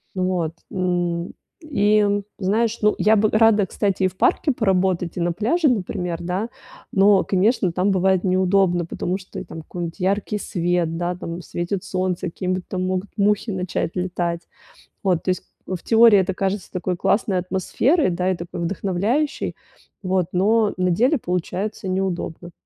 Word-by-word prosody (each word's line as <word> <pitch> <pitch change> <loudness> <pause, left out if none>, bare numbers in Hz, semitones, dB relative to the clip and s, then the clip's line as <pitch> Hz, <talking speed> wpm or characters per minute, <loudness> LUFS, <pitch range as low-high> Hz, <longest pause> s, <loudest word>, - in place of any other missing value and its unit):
Вот, 185 -3 -1 0.2
м, 175 -3 -1 0.3
и, 215 -9 +2 0.3
знаешь, 220 +4 +1
ну, 210 0 +3
я 215 +1 +5
бы 215 +1 +3
рада, 215 -2 +4
кстати, 195 +1 -1
и - - +5
в 185 - -8
парке 285 - +2
поработать, 185 -5 0
и - - -1
на 170 0 +1
пляже, 250 - +1
например, 180 -6 -2
да, 180 +5 -2 0.5
но, 195 0 +5
конечно, 195 0 +2
там 185 +3 +1
бывает 190 -1 +2
неудобно, 185 -1 +2
потому 180 +2 -3
что, 190 -1 -11
и - - -5
там 160 - -9
какой-нибудь 170 +2 -6
яркий 200 +3 0
свет, 175 -4 -1
да, 175 +1 -1
там 170 0 -6
светит 175 +2 -3
солнце, 185 -1 -2
какие-нибудь 185 +1 -3
там 185 -1 -2
могут 185 +1 -2
мухи 210 +2 +2
начать 185 -3 -2
летать. 175 -2 -2 0.6
Вот, 185 -4 +1
то - - -2
есть, 185 0 0 0.2
э, - - -3
в 175 - -8
теории, 225 -2 +6
это 190 0 0
кажется 195 0 -2
такой 180 -1 -2
классной 200 +1 +1
атмосферой, 190 - +1
да, 180 +1 0
и - - 0
такой 170 +1 -7
вдохновляющей. 200 - -1 0.5
Вот. 185 -1 +1
Но 210 +4 +3
на 185 0 +1
деле 250 - +3
получается 185 +3 -3
неудобно. 180 -2 -3
185 Hz, 160 wpm, -22 LUFS, 180-205 Hz, 0.6 s, теории